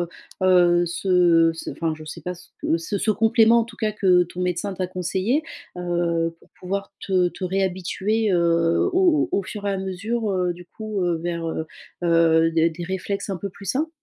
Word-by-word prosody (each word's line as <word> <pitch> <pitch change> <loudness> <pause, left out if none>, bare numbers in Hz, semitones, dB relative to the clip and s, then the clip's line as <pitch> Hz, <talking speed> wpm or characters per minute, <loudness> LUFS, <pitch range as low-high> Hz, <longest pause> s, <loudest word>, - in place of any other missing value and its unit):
heu 175 - -2 0.3
heu, 175 -2 +4
ce 170 -2 +3
ce 165 - -6
enfin, 165 -1 -2
je 155 0 -11
sais 155 +1 -8
pas 180 - -3
ce 175 +1 -16
que 165 - +1
ce 200 +5 -1
complément, 225 +2 +4
en - - 0
tout 230 0 -14
cas, 215 -2 -1
que 185 -4 +4
ton 175 +1 -9
médecin 180 +2 -1
t'a 185 0 -2
conseillé, 185 - -1 0.3
heu, 170 -1 -1
pour - - -23
pouvoir 195 +2 -4 0.2
te 185 -2 +3
te 185 - -7
réhabituer, 190 +3 0
heu, 170 - +2
au 350 -5 +3
au 200 - 0
fur 205 +2 -7
et - - +1
à - - -1
mesure, 205 +4 -2
heu, 180 -2 0
du 175 0 -12
coup, 215 0 -5
heu, 175 -1 +1
vers, 170 0 -3
heu 160 0 -3 0.4
heu, 165 -1 +4
des 165 0 +2
des 170 +1 -7
réflexes 190 +3 -3
un 190 - -2
peu 200 +3 -5
plus 195 +1 -12
sains? 300 - 0
180 Hz, 200 wpm, -23 LUFS, 170-200 Hz, 0.4 s, heu